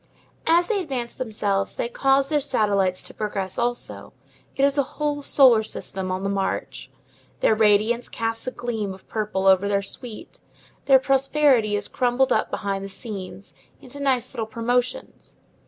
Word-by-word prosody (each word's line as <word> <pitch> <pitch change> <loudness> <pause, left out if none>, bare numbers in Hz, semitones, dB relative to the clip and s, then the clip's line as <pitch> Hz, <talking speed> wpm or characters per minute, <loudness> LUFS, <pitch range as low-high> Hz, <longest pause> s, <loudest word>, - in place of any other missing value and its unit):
As 340 +2 +5
they 425 -1 0
advance 255 -8 -4
themselves, 205 -5 -2
they - - -1
cause 270 +2 +2
their 295 0 +1
satellites 205 -9 +1
to - - -11
progress 195 -3 -3
also; 240 0 -3 0.4
it 275 - 0
is 280 0 +2
a 285 - +3 0.2
whole 295 -1 -1
solar 260 -5 +5
system 190 -3 -5
on 185 +1 -3
the - - 0
march. 195 -1 -3 0.5
Their - - +4
radiance 215 +2 +2
casts 225 +1 -3
a - - -1
gleam 220 -6 -4
of 190 - -20
purple 210 -3 -2
over 190 +1 +5
their 200 -1 +1
suite. 215 +3 -9 0.5
Their 270 -1 +7
prosperity 270 -4 +3
is 205 - -3
crumbled 250 +1 +1
up - - 0
behind 195 -1 -3
the 195 - -6
scenes, 190 -2 -8 0.3
into 265 +2 -11
nice 260 -3 0
little 225 -4 -3
promotions. 245 +3 -2
230 Hz, 160 wpm, -23 LUFS, 200-265 Hz, 0.5 s, Their